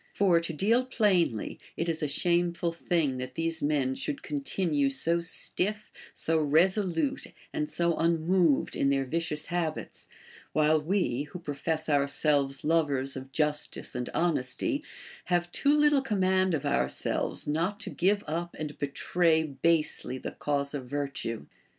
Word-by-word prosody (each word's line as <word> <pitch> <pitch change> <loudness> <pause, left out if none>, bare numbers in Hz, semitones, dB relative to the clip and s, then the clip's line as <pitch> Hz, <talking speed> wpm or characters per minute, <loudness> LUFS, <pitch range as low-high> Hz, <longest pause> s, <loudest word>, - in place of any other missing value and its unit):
For, 185 -4 +4
to 165 0 -4
deal 215 +10 +2
plainly, 185 - +1 0.2
it 165 - -1
is 165 -1 -1
a 150 - 0
shameful 170 +3 +1
thing 165 -5 0
that 130 0 -6
these 165 0 -1
men 145 -3 +1
should 280 - -4
continue 180 - 0
so 165 +5 +2
stiff, 210 +5 -2 0.2
so 160 0 0
resolute, 180 - +1 0.3
and 305 -1 -2
so 170 -1 +1
unmoved 165 -1 +2
in 140 - +2
their 135 -1 +1
vicious 155 +1 -1
habits, 170 -3 -4 0.5
while 155 0 +3
we, 150 -6 0
Λνΐιο 180 - -8
])rofess 155 +2 -2
ourselves 140 -1 +1
lovers 145 -4 +1
of 130 0 -8
justice 150 0 -1
and 125 -1 -3
honesty, 175 - 0 0.4
have 175 -1 0
too 285 +8 +3
little 295 -2 +4
command 190 -6 +1
of 145 -1 -4
ourselves 140 0 0
not 170 +8 -1
to - - -5
give 200 +3 +1
up 170 +3 -3
and 150 -1 -6
betray 160 +3 +1
basely 155 -2 0
the - - -6
cause 140 -1 -2
of 140 -3 -4
virtue. 140 - -4
165 Hz, 145 wpm, -29 LUFS, 145-180 Hz, 0.5 s, For